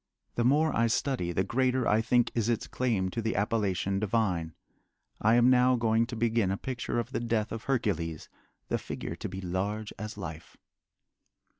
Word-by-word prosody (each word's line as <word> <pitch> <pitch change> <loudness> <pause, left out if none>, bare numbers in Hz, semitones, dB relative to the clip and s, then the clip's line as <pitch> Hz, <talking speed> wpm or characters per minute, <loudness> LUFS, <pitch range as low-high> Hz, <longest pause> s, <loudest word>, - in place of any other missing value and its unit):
The 120 - 0
more 150 +5 +3
I 115 0 +3
study 115 -6 0
the 90 +2 +1
greater 130 +3 +1
I 110 +1 +4
think 120 +1 +2
is 115 -1 0
its 115 - 0
claim 110 -7 0
to 115 - -2
the 110 +1 -1
appellation 100 -2 0
divine. 95 -7 0 0.7
I 110 +2 +4
am 120 +1 +6
now 125 0 +5
going 115 -1 +2
to 125 - -6
begin 115 -3 +1
a 95 - -1
picture 125 0 -3
of 120 - -2
the - - -1
death 115 -2 -1
of 115 0 -5
Hercules, 85 - -1 0.4
the - - -1
figure - - -5
to - - -5
be 95 +1 -6
large 100 +4 -3
as 105 +1 -6
life. 85 -5 -8
110 Hz, 180 wpm, -29 LUFS, 95-120 Hz, 0.7 s, am